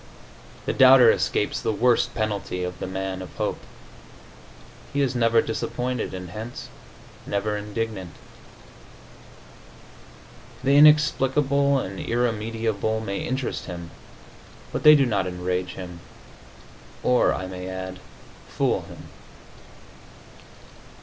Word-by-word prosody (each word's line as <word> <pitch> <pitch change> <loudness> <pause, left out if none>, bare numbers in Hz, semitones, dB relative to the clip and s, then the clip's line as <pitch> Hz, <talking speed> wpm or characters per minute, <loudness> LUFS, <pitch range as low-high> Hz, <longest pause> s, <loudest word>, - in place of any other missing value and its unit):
The - - -1
doubter 130 -3 +7
escapes - - -1
the - - 0
worst 120 +3 +2
penalty 105 -4 -2
of 90 0 -5
the - - -4
man 95 0 -4
of 95 - -10
hope; - - -2 1.3
he 140 - -2
is 135 -1 +1
never 115 -2 +3
disappointed, 125 +2 -3
and 90 -2 -7
hence 110 +5 -7 0.6
never 105 +1 -1
indignant. 105 -2 -4 2.5
The 135 +2 +3
inexplicable 140 -2 +4
and 95 -7 -4
irremediable 110 -2 -1
may 100 -3 -3
interest 130 0 -3
him, 85 -2 -8 0.8
but - - -3
they 150 0 +9
do 140 -2 +4
not 100 -6 0
enrage 90 0 -3
him, 90 -2 -8 1.0
or, 125 -1 +3
I 95 - -3
may 90 0 -7
add, 95 0 -6 0.5
fool - - 0
him. - - -12
110 Hz, 110 wpm, -24 LUFS, 95-125 Hz, 2.5 s, they